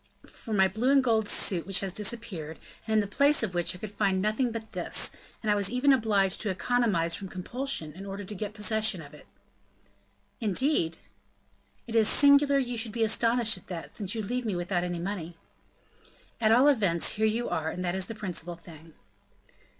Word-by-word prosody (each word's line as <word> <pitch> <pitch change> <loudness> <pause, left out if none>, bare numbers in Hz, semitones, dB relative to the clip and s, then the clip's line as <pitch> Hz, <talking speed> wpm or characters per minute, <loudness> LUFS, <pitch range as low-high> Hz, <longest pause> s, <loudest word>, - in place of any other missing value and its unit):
"For 225 - -11
my 190 -2 +4
blue 220 +7 -1
and 275 -1 +5
gold 220 -4 +2
suit, 175 -3 +1
which 195 -2 0
has 195 -2 -3
disappeared, 195 -8 -3 0.3
and 220 - 0
in - - +5
the 205 0 -7
place 285 -2 +4
of 200 -5 -2
which 175 0 0
I - - -9
could 205 +2 -7
find 200 -2 +1
nothing 215 +5 0
but 225 -1 -7
this; - - -1 0.3
and 215 - +1
I - - +5
was 200 -1 0
even 255 +3 +3
obliged 205 -6 +1
to 215 - -1
economize 195 -5 +1
from 195 - -5
compulsion, 185 - -4
in 195 +3 -9
order 200 +1 -6
to 200 - -7
get 210 +1 -5
possession 215 -4 0
of 145 0 -14
it." 150 - -15 1.1
"Indeed?" 210 - +1 0.9
"It 230 - -8
is 220 -2 +5
singular 280 0 +5
you 245 -3 -1
should 225 -2 -2
be 230 - 0
astonished 230 0 +2
at - - -24
that, 175 -3 -7
since 205 0 -3
you 220 - -2
leave 250 +5 -2
me 215 -5 -2
without 175 0 -1
any 175 -1 -3
money." 175 -2 -5 1.0
"At 220 -1 +3
all 250 +5 +6
events, 200 - +3
here 220 +1 +1
you 230 +3 -1
are, 160 0 -1
and 180 +2 -4
that 175 - -1
is 190 -1 -1
the 225 - -6
principal 175 -4 -5
thing." 165 -2 -14
210 Hz, 200 wpm, -28 LUFS, 180-230 Hz, 1.1 s, all